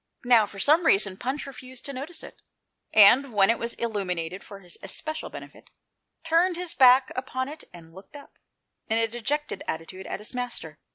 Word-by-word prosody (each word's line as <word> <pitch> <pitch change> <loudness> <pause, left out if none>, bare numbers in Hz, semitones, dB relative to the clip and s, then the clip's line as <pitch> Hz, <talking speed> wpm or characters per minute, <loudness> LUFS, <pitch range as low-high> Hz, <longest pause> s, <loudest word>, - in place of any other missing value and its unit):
Now, 235 -4 +5
for 200 - -11
some 310 - +3
reason. 195 -1 +3
Punch 260 +8 -4
refused 260 -2 -10
to 280 - -5
notice 285 +6 -7
it, - - -13 0.5
and, 240 +6 +6
when 200 +1 +4
it 230 - -2
was 235 0 -3
illuminated 185 -6 -3
for 200 - -11
his 180 -2 -9
especial 310 +11 -5
benefit, - - -12 0.5
turned 335 +2 +2
his 355 -1 -5
back 255 0 +6
upon 260 0 -3
it 310 +2 -9
and 165 -2 -14
looked 190 - -15
up, 285 - -14 0.5
in 220 - +2
a 225 0 +2
dejected 260 +7 -3
attitude, 175 +4 -6
at - - -5
his 210 - -9
master. 240 -11 -5
240 Hz, 180 wpm, -26 LUFS, 195-280 Hz, 0.5 s, and